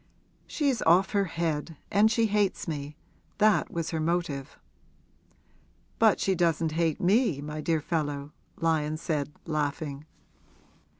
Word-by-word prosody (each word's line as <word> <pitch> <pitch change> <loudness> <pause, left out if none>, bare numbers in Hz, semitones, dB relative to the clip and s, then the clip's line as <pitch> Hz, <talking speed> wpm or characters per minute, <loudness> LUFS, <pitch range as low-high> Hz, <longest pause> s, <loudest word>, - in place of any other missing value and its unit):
'She's 275 -6 0
off 180 +4 +4
her 200 -1 +2
head 165 -2 -3
and 210 +2 +5
she 225 0 +2
hates 205 -3 0
me; 150 -1 -5 0.4
that 215 0 +3
was 165 -1 -3
her 160 - -1
motive.' 155 -4 -2 1.4
'But 220 -2 +5
she 195 - +1
doesn't 165 -2 +1
hate 160 -1 0
me, 195 - +2
my 150 +1 -5
dear 160 0 0
fellow!' 145 -3 -2 0.2
Lyon 155 -2 0
said, 150 -3 -2
laughing. 150 -1 -3
165 Hz, 125 wpm, -28 LUFS, 150-190 Hz, 1.4 s, and